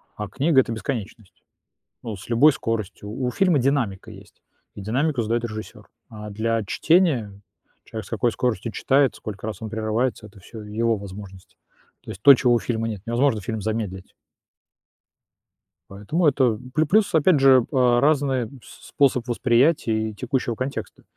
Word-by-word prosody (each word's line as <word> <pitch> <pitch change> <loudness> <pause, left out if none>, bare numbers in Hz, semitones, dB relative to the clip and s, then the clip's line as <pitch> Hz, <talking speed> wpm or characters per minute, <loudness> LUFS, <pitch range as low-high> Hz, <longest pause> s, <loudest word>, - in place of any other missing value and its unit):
а 105 - -5
книга- 140 - +3
это 120 - -5
бесконечность, 110 -3 -6 0.6
ну, 110 -2 -5
с 95 - -13
любой 125 +6 +5
скоростью. 110 -4 -4
У 125 +1 -3
фильма 180 -5 +2
динамика 120 -8 -1
есть, - - -16 0.3
и - - -8
динамику 130 +6 0
задаёт 115 +2 -1
режиссёр, 110 -1 -8 0.2
а 105 -1 -9
для 110 +2 -1
чтения 130 - +1 0.5
человек 110 -1 -7
с - - -14
какой 115 +1 0
скоростью 115 -1 -2
читает, 135 +2 +2
сколько 105 0 -7
раз 110 - -6
он 110 - -5
прерывается- 110 +2 -2
это 100 -1 -17
всё 110 +3 -11
его 110 +2 -1
возможности. 95 -1 -11 0.4
То - - -9
есть 95 - -10
то, 140 - +9
чего 125 -2 +2
у 120 - +3
фильма 115 -1 -2
нет,- 105 -4 -5
невозможно 120 -1 +1
фильм 110 +2 -4
замедлить 105 -4 -4 1.8
Поэтому 105 - -1
это 130 -6 +2 0.2
плю 155 +1 +2
плюс, 205 +3 +2
опять 160 0 +4
же, 130 -3 +5
а, 125 -3 +3
разный 140 -5 +1 0.2
с - - -15
способ 130 -4 +1
восприятия 120 -2 +1
и - - -9
текущего 120 +2 -2
контекста, 130 +4 -6
115 Hz, 160 wpm, -23 LUFS, 110-135 Hz, 1.8 s, то